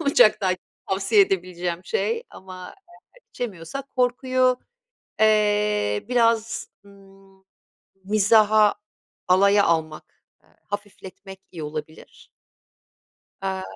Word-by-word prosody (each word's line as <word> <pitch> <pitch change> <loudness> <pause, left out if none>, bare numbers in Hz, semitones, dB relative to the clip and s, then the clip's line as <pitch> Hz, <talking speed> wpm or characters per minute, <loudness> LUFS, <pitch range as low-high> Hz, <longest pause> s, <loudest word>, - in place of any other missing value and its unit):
uçaktayken 205 - +3 0.2
tavsiye 195 +2 +2
edebileceğim 180 -2 -1
şey 460 +1 -1
ama, 185 -1 -11 0.5
eee, - - -19
içemiyorsak 240 +5 -6
korkuyu, 255 0 +1 0.6
eee, 210 - +2
biraz, 230 -1 +1 0.2
ımm, 195 -1 -20 0.6
mizaha, 215 +1 +4 0.5
alaya 200 +2 +4
almak, 160 -2 -2 0.2
ııı, - - -30
hafifletmek 195 -1 -8
iyi 165 -3 -7
olabilir. 155 +1 -9 1.1
Aaa, 190 -1 -3
200 Hz, 85 wpm, -23 LUFS, 185-220 Hz, 1.1 s, mizaha